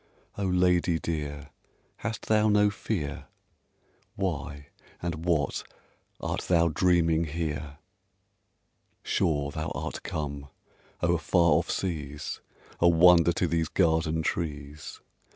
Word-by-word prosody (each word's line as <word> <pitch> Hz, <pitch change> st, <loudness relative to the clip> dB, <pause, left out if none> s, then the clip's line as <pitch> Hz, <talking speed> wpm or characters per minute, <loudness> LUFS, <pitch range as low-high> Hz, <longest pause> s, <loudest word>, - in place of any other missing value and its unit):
Oh, 100 Hz, -1 st, -1 dB
lady 90 Hz, -2 st, +3 dB
dear, 75 Hz, -3 st, -4 dB, 0.5 s
hast 110 Hz, 0 st, -5 dB
thou 110 Hz, 0 st, +3 dB
no 105 Hz, 0 st, +4 dB
fear? 90 Hz, -8 st, -4 dB, 0.9 s
Why 75 Hz, -7 st, -4 dB, 0.3 s
and 85 Hz, -1 st, -4 dB
what 80 Hz, -6 st, +1 dB, 0.6 s
art -, -, -2 dB
thou 85 Hz, -1 st, +4 dB
dreaming 85 Hz, 0 st, +2 dB
here? 75 Hz, -2 st, -4 dB, 1.3 s
Sure 70 Hz, -3 st, 0 dB
thou 80 Hz, +1 st, -3 dB
art -, -, -4 dB
come 70 Hz, -2 st, -4 dB, 0.6 s
o'er 85 Hz, -1 st, +3 dB
far 85 Hz, +1 st, +3 dB
off 80 Hz, +3 st, +2 dB
seas, 75 Hz, -5 st, -3 dB, 0.4 s
A 85 Hz, -, +6 dB
wonder 85 Hz, 0 st, +6 dB
to 90 Hz, -, 0 dB
these 80 Hz, -1 st, 0 dB
garden 80 Hz, -2 st, +1 dB
trees! 75 Hz, -3 st, -4 dB
80 Hz, 110 wpm, -28 LUFS, 75-90 Hz, 1.3 s, A